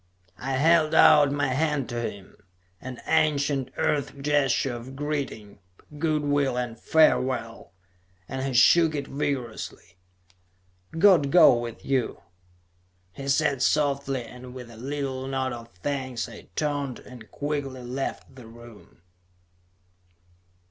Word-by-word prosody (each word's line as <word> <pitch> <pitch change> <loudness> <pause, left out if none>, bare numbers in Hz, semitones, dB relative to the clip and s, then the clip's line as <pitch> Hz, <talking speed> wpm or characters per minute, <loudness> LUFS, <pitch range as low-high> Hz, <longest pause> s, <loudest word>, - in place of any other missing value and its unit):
I 135 +2 -3
held 155 +3 +3
out 145 -2 +7
my 145 -1 0
hand 145 -1 0
to 120 -1 -3
him 100 -4 -7 0.5
an 130 -1 -8
ancient 145 -4 +1
Earth 145 -1 -1
gesture 140 -2 +1
of 120 +3 -8
greeting, 140 -8 -4 0.4
good 155 -1 0
will 145 -3 +1
and 120 -2 -4
farewell 130 - +1 0.5
and 130 0 -4
he 135 - -2
shook 160 +5 +5
it 140 -1 -3
vigorously. 125 -10 -5 1.0
"God 170 -6 +5
go 170 -5 +7
with 120 -1 -6
you," 130 -10 -1 0.9
he 135 +8 -8
said 140 -1 +1
softly, 140 -3 +1
and 125 +1 -11
with 125 -2 -9
a - - -13
little 135 +1 -4
nod 130 -1 -2
of 115 -1 -9
thanks 130 -4 -3
I - - -12
turned 145 -4 -2
and 120 -4 -13
quickly 145 -3 -4
left 130 +1 -5
the 125 -4 -12
room. 115 -6 -15
135 Hz, 125 wpm, -26 LUFS, 125-145 Hz, 1.0 s, out